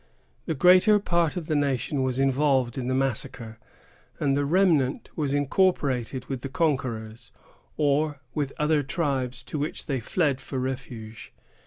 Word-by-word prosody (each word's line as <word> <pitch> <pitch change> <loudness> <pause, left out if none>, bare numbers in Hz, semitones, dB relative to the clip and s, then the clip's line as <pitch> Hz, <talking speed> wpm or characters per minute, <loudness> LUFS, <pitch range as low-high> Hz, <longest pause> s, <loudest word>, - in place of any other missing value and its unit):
The 160 - -1
greater 185 +7 +6
part 170 -4 0
of 170 - -4
the 155 - -1
nation 140 -1 0
was 130 -1 -1
involved 135 -2 +2
in 125 -2 -3
the 130 - 0
massacre, 115 -3 -2 0.6
and 140 -2 +1
the 145 0 +1
remnant 155 -5 +2
was 145 -4 -1
incorporated 140 - +1
with 135 -3 -5
the 135 - -5
conquerors, 125 -7 -2 0.5
or 145 0 +1
with 145 -3 -2
other 150 0 +2
tribes, 135 -4 -2
to 150 - -5
which 150 +2 -4
they 135 -3 -1
fled 140 +2 0
for 135 - -6
refuge. 125 -4 -6
140 Hz, 150 wpm, -26 LUFS, 130-155 Hz, 0.6 s, greater